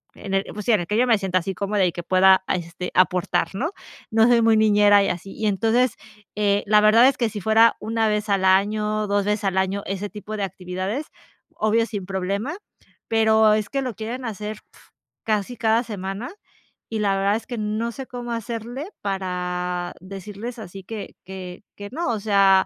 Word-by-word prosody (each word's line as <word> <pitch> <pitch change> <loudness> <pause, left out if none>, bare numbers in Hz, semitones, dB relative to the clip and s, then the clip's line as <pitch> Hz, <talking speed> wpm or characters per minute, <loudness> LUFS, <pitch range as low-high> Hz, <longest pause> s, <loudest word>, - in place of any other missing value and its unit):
en 195 - -7
el, 195 0 +2
pues 210 -1 -7
sí, - - +3
en 200 - +3
el 170 - -6
que 210 - 0
yo 245 - +4
me 225 -3 +5
sienta 190 -2 0
así 190 +2 -4
cómoda 200 0 +1
y 175 - +1
que 175 - -5
pueda 190 +1 +5
este 180 0 -3
aportar, 180 0 +2
¿no? 295 - -1 0.4
No 225 +1 +5
soy 240 -1 +5
muy 225 -1 +4
niñera 205 -1 +5
y - - 0
así. 185 +2 -5
Y 220 - -4
entonces, 225 +4 +2 0.4
eh, 205 -1 +1
la 210 0 +5
verdad 225 +4 +6
es 275 - +3
que 235 -3 +1
si 210 -1 -6
fuera 220 +3 +4
1, 225 +1 0
vez 210 0 -1
al 195 -1 +2
año, 210 +3 +2
2, 200 0 +1
veces 210 +1 0
al 190 - 0
año, 190 +1 0
ese 195 +1 -3
tipo 210 +1 -7
de - - -3
actividades, 190 - -4 0.5
obvio, 220 +2 +2
sin 205 -5 -5
problema, 200 - -2 0.5
pero, 220 -1 +4
es 210 -2 0
que 275 -1 -1
lo 255 -3 -3
quieren 240 +4 -5
hacer 210 -1 -5 0.2
uf, - - -19 0.4
casi 215 +2 -1
cada 225 +1 +2
semana. 200 +1 -5 0.6
Y 225 - -3
la 200 -2 +2
verdad 200 +1 +2
es - - -10
que 240 - -5
no 215 +2 -2
sé 265 +2 -8
cómo 245 -1 -6
hacerle 235 - -5
para 180 -2 -3
decirles 200 +5 -7
así 195 -1 -9
que 215 +2 -7
que 185 0 -8
que 205 0 -8
no. 315 0 -2
O 220 - -1
sea, 195 -2 +4
210 Hz, 200 wpm, -23 LUFS, 195-225 Hz, 0.6 s, verdad